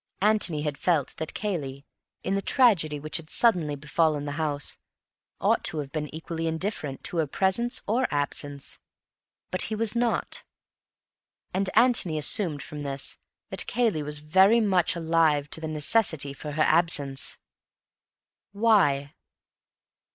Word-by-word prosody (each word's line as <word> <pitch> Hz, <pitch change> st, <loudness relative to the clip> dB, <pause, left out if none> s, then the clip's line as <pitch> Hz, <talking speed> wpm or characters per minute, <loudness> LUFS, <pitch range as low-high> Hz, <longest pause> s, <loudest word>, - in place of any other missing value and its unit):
Antony 205 Hz, -8 st, +3 dB
had 150 Hz, -2 st, -3 dB
felt 160 Hz, -7 st, 0 dB
that 160 Hz, -, -5 dB
Cayley, 140 Hz, -10 st, -4 dB, 0.4 s
in 190 Hz, -, -1 dB
the 195 Hz, -, 0 dB
tragedy 190 Hz, -, +2 dB
which 155 Hz, +2 st, -2 dB
had 160 Hz, -1 st, -8 dB
suddenly 175 Hz, -11 st, +2 dB
befallen 150 Hz, 0 st, 0 dB
the 145 Hz, -, -4 dB
house, 145 Hz, -2 st, -2 dB, 0.6 s
ought -, -, +1 dB
to 160 Hz, -, 0 dB
have 140 Hz, -2 st, -5 dB
been 155 Hz, -1 st, -3 dB
equally 165 Hz, +1 st, -5 dB
indifferent 160 Hz, -4 st, -3 dB
to 175 Hz, -, -3 dB
her 160 Hz, -2 st, +1 dB
presence 195 Hz, -, 0 dB
or 245 Hz, +5 st, +1 dB
absence. 145 Hz, -1 st, -2 dB, 0.7 s
But 185 Hz, -, -1 dB
he 220 Hz, -, -2 dB
was 225 Hz, +1 st, +1 dB
not; 235 Hz, -1 st, -1 dB, 1.1 s
and 190 Hz, +1 st, +1 dB
Antony 225 Hz, -9 st, +4 dB
assumed 150 Hz, -1 st, +1 dB
from 150 Hz, -, -8 dB
this 140 Hz, -1 st, -2 dB, 0.3 s
that -, -, +1 dB
Cayley 225 Hz, -10 st, 0 dB
was 150 Hz, 0 st, -3 dB
very 190 Hz, +9 st, +4 dB
much 190 Hz, -5 st, +2 dB
alive 160 Hz, -3 st, +1 dB
to 160 Hz, -, -1 dB
the 160 Hz, -, -4 dB
necessity 155 Hz, -2 st, +2 dB
for 150 Hz, +1 st, -7 dB
her 155 Hz, +1 st, +2 dB
absence. 145 Hz, -5 st, +1 dB, 1.2 s
Why? 190 Hz, -11 st, +2 dB
160 Hz, 140 wpm, -26 LUFS, 145-195 Hz, 1.2 s, Antony